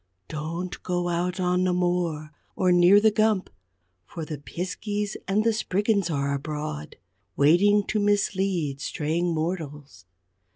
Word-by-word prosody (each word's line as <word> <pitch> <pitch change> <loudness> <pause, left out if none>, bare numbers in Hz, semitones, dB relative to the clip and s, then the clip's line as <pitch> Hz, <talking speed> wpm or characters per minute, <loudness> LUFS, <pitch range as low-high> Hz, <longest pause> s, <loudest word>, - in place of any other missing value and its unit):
Don't 165 +4 -5
go 175 -1 -1
out 175 +2 -1
on 180 0 +1
the 185 -1 +2
moor, 175 -4 -1 0.2
or 185 -1 +2
near 180 +3 +6
the 215 +1 +4
Gump, 215 -2 +1 0.5
for 160 - -7
the 150 -3 -6
Piskeys 205 +6 -4
and 205 +2 +2
the 230 0 +2
Spriggans 205 -2 0
are 140 -2 -1
abroad, 140 - -5 0.4
waiting 195 +8 +4
to 215 - -1
mislead 190 -8 0
straying 165 +5 -1
mortals. 150 - -4
175 Hz, 130 wpm, -25 LUFS, 155-195 Hz, 0.5 s, near